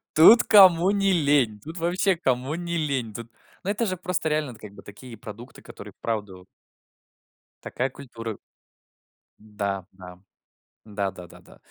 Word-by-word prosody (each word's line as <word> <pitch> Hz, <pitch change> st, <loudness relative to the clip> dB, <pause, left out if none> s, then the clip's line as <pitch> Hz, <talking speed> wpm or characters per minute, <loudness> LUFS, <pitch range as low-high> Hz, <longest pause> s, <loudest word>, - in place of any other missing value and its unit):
Тут 220 Hz, +10 st, +8 dB
кому 185 Hz, -3 st, +6 dB
не 195 Hz, -1 st, +1 dB
лень. 140 Hz, -, +2 dB
Тут 160 Hz, -, -9 dB
вообще 180 Hz, +3 st, +1 dB
кому 130 Hz, -2 st, -1 dB
не 170 Hz, 0 st, -4 dB
лень. 135 Hz, -8 st, -2 dB
Тут, 115 Hz, 0 st, -8 dB, 0.3 s
ну, 200 Hz, -, -1 dB
это 225 Hz, +3 st, -1 dB
же 185 Hz, -2 st, -2 dB
просто 180 Hz, -2 st, -2 dB
реально, 150 Hz, -2 st, -1 dB
это 115 Hz, -, -16 dB
как 105 Hz, -2 st, -11 dB
бы -, -, -14 dB
такие 115 Hz, +4 st, -12 dB
продукты, 115 Hz, +3 st, -11 dB
которые -, -, -12 dB
вправду 100 Hz, -5 st, -5 dB, 1.2 s
Такая 130 Hz, -, -2 dB
культура. 115 Hz, -5 st, -8 dB, 1.0 s
Да 100 Hz, -3 st, -4 dB
да 90 Hz, -1 st, -12 dB, 0.7 s
да 100 Hz, -2 st, -3 dB
да 90 Hz, -2 st, -12 dB
да -, -, -16 dB
да. -, -, -19 dB
130 Hz, 155 wpm, -24 LUFS, 105-170 Hz, 1.2 s, Тут